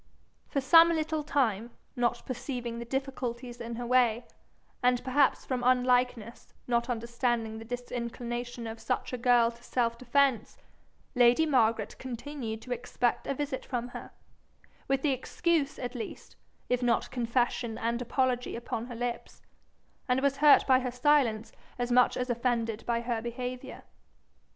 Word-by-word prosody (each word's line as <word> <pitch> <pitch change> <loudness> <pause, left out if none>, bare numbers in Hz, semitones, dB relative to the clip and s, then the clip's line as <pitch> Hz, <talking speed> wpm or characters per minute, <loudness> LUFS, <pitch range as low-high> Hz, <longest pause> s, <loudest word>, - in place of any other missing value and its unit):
For 275 - -1
some 330 +5 +7
little 315 -2 -1
time, 240 -7 0 0.3
not 240 -1 0
perceiving 245 -2 -4
the 235 - -6
difficulties 250 -2 -4
in 235 0 -5
her 240 +1 -5
way, 240 -1 +3 0.6
and 250 0 +3
perhaps 270 +1 +2
from 255 -2 -2
unlikeness 250 -2 +1
not 235 0 0
understanding 235 -1 -1
the 225 - -9
disinclination 240 0 -5
of 225 0 -6
such 250 +3 -2
a - - -1
girl 240 -1 +4
to 235 0 -18
self 235 -2 -1
defence, 255 -2 +1 0.6
lady 245 +4 +5
Margaret 230 -7 +2
continued 245 -3 -6
to 250 - -10
expect 245 0 -1
a 275 - -1
visit 275 -1 -3
from 245 -2 -4
her, - - -8 0.8
with 270 +2 0
excuse 295 +3 0
at 245 -1 -5
least, 240 -3 -8 0.3
if 250 0 0
not 240 -2 +1
confession 240 -1 -1
and 235 +1 -1
apology 250 0 0
upon 235 0 -4
her 245 - -7
lips, 240 0 -5 0.7
and 250 +1 +3
was 275 0 +1
hurt 295 0 +6
by 260 -2 +5
her 255 -1 -2
silence 245 -4 +2 0.3
as 245 0 -2
much 250 0 +4
as 250 - -1
offended 230 -2 -1
by 235 -1 +1
her 235 -1 -2
behaviour. 245 +2 -6
245 Hz, 145 wpm, -29 LUFS, 235-260 Hz, 0.8 s, some